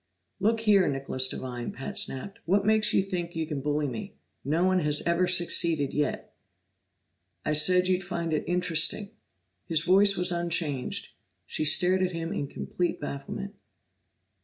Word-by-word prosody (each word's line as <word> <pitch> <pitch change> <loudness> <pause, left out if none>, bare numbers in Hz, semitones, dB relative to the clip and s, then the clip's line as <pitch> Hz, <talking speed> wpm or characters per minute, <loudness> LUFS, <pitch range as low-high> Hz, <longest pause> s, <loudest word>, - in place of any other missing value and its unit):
"Look 225 +3 +1
here, 205 -4 +4
Nicholas 135 -2 0
Devine!" 125 -2 -5
Pat 135 +10 -7
snapped, 200 -2 -3
"What 200 +3 +2
makes 215 0 +4
you 195 - +3
think 175 -3 -4
you 160 -1 -1
can 150 -3 -4
bully 150 +1 -1
me? 120 -4 -7 0.3
No 155 +6 0
one 185 0 +3
has 150 -3 0
ever 170 +2 +1
succeeded 170 -5 +2
yet!" 150 0 -2 1.1
"I 155 - +1
said 180 +4 +3
you'd 185 0 +1
find 170 -3 -3
it 155 - 0
interesting." 180 +3 +1 0.6
His 160 -2 +1
voice 195 +2 +4
was 180 +1 0
unchanged; 170 -6 -1 0.4
she 155 - -2
stared 180 +4 +3
at 185 -1 0
him 165 0 -4
in 140 - -3
complete 175 +5 -3
bafflement. 145 +8 -6
170 Hz, 155 wpm, -27 LUFS, 150-185 Hz, 1.1 s, here